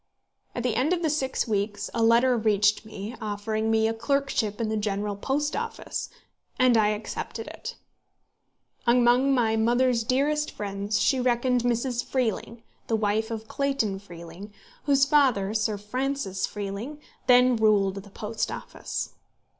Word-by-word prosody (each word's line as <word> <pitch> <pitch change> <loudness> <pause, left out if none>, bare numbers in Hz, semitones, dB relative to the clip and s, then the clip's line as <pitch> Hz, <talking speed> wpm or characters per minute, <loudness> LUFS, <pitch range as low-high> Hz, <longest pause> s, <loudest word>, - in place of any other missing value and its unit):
At 240 - -2
the 245 -2 0
end 290 +7 +2
of 350 -1 -1
the 315 - +2
six 265 -5 -1
weeks 205 -1 -2
a 230 - -1
letter 235 +3 +5
reached 210 -1 +2
me, 215 +2 -7
offering 215 +1 -2
me 220 0 +3
a 225 - 0
clerkship 235 -3 -1
in 230 - 0
the 220 - -1
General 205 -1 -2
Post 285 +8 -1
Office, - - -4 0.5
and 255 -2 +4
I 215 -2 +4
accepted 210 +1 -4
it. - - -7 1.1
Among 245 +3 +4
my 230 -4 +2
mother's 240 +1 +2
dearest 290 +5 +1
friends 200 0 -3
she 260 +6 +2
reckoned 250 0 +2
Mrs. 240 0 0
Freeling, 230 -2 -2 0.2
the 225 - +1
wife 215 +1 0
of 225 -1 -5
Clayton 275 -9 -1
Freeling, 175 +1 -11 0.3
whose 275 -1 +4
father, 255 -9 +3
Sir 215 -1 0
Francis 210 -2 -2
Freeling, 210 +8 -5 0.3
then 250 0 +6
ruled 210 -3 +3
the 200 +1 -9
Post 215 +2 -3
Office. - - -5
225 Hz, 145 wpm, -26 LUFS, 210-255 Hz, 1.1 s, then